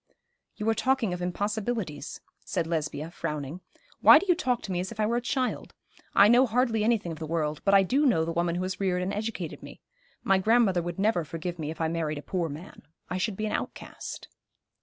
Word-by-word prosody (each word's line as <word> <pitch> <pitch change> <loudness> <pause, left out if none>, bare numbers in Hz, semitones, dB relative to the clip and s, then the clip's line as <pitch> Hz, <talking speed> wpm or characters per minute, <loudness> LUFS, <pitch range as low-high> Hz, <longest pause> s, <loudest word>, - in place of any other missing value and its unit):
'You 210 - -4
are 225 - +4
talking 255 -5 +1
of 180 - -5
impossibilities,' 200 - -3 0.2
said 165 - -2
Lesbia, 160 -1 -3
frowning. 150 0 -5 0.4
'Why - - +9
do - - 0
you 360 - +6
talk 250 -7 -1
to 195 - -5
me 175 - -1
as 185 +3 -3
if 230 - -10
I 215 - +3
were 235 +2 +1
a - - -1
child? 255 +1 -2 0.4
I 200 - +8
know 245 +4 +6
hardly 230 -1 +1
anything 215 -6 +1
of 160 - -7
the 160 - -5
world, 155 -2 -1
but 200 0 +4
I 195 - +7
do 275 +10 +2
know 165 -10 +3
the 165 - -2
woman 170 0 0
who 180 - -1
has 185 0 -4
reared 180 -2 0
and 190 - -2
educated 210 -6 -4
me. - - -11 0.4
My 195 -1 +3
grandmother 210 -3 +3
would 175 0 -5
never 200 -3 +2
forgive 165 +3 -5
me 150 -1 -3
if 160 - -7
I 160 - +1
married 160 -2 -2
a 145 - -7
poor 175 -4 -2
man. 155 +6 -9 0.3
I 185 - -1
should 195 0 -1
be 215 - -2
an 210 - -2
outcast.' - - -6
185 Hz, 225 wpm, -28 LUFS, 165-220 Hz, 0.4 s, Why